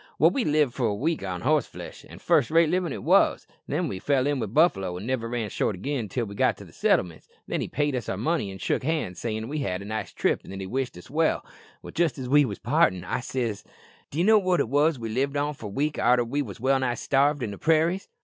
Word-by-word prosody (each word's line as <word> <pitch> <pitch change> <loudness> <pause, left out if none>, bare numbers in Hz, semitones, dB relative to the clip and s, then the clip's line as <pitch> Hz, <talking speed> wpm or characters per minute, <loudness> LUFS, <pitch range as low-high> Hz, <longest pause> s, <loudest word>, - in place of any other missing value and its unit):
"Well, - - +5
we 275 - 0
lived 150 - +2
for 125 -4 0
a 105 - -1
week 160 +5 -1
on 90 -2 -4
horseflesh, 150 -1 -2
an' - - -11
first - - +2
rate 165 0 +4
livin' 180 -3 0
it - - -5
wos; - - +3 0.2
then - - -1
we 95 - -4
fell 135 +3 +1
in 145 -1 0
with 110 -4 -3
buffalo, 95 - +2
an' 95 - -7
niver 115 -2 -2
ran 115 -3 -3
short 105 - 0
again 125 +2 -3
till 120 +2 -2
we 100 - -8
got - - +1
to - - -11
the - - -17
settlements, 85 -3 0 0.2
when - - -2
he - - -2
paid 145 -2 -1
us 120 -4 -4
our - - -2
money 150 - 0
an' 95 - -8
shook - - -1
hands, 150 - -2
sayin' 110 -1 -3
we'd 150 +2 -3
had 90 -6 -2
a - - -10
nice 110 +1 -4
trip, - - 0
an' 95 - -8
he 95 - -4
wished 125 0 -3
us 90 - -13
well. 160 +2 +1 0.5
Jist 170 -2 +1
as 130 -2 -5
we 145 +2 +5
wos 105 -5 -5
partin' 120 - +2
I 95 - -2
said, 120 -4 -2
says - - -17
I, - - -29 0.4
'D'ye 160 +5 -1
know 215 +2 +6
what 185 -2 +1
it - - 0
wos 145 +3 +3
we 115 -2 -5
lived 135 +5 -1
on 145 +1 0
for 115 -6 -8
a - - -6
week 145 +8 -1
arter 120 0 +4
we 140 +5 -1
wos 105 -8 -7
well 135 +3 +2
nigh 125 -2 0
starved 140 +3 +1
in 110 - -3
the 100 - -9
prairies?'" 165 +4 +2
130 Hz, 265 wpm, -26 LUFS, 110-150 Hz, 0.5 s, know